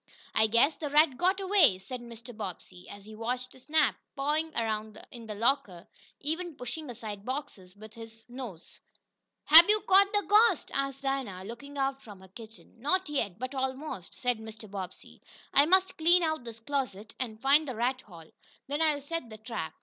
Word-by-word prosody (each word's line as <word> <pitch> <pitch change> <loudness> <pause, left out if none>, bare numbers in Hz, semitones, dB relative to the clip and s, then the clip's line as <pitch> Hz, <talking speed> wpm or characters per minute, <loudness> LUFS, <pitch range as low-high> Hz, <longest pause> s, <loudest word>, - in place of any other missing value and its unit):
"I 220 - +4
guess 235 +8 +3
the 300 - -4
rat 300 -1 +4
got 370 +7 +1
away," 380 - +4
said 240 +7 -7
Mr. 235 0 -11
Bobbsey, 185 -3 -8
as 200 0 -11
he 215 - -11
watched 250 +3 -3
Snap 305 +1 +2 0.2
pawing 300 +3 0
around 220 -1 -2
in 235 -2 -11
the 210 - -5
locker, 205 -6 0 0.3
even 325 +3 -3
pushing 290 +4 -6
aside 210 -4 -7
boxes 210 -8 -6
with 215 +1 -13
his 225 -1 -12
nose. 240 -9 -9 0.6
"Hab 330 +5 +9
yo' 425 0 +5
cotched 395 0 +5
de 410 0 +2
ghost?" 420 -1 +4
asked 275 0 -2
Dinah, 260 -9 -2
looking 240 +7 -9
out 270 0 -1
from 205 -6 -12
her 190 - -14
kitchen. 220 +3 -14
"Not 365 +5 0
yet 220 -11 -2
but 255 +3 -5
almost," 265 - -4
said 245 -2 -1
Mr. 220 0 -10
Bobbsey. 190 -2 -8 0.3
"I 285 +2 +6
must 375 +1 +3
clean 345 +2 +5
out 315 -5 -1
this 230 -1 -8
closet, 230 -5 -3
and 225 -4 -4
find 280 +4 +4
the 260 - -4
rat 250 +3 -1
hole. 170 -7 -14 0.3
Then 290 +3 -3
I'll 305 -3 +2
set 285 -3 -5
the 215 - -10
trap. 220 -6 -5
250 Hz, 180 wpm, -29 LUFS, 220-300 Hz, 0.6 s, Hab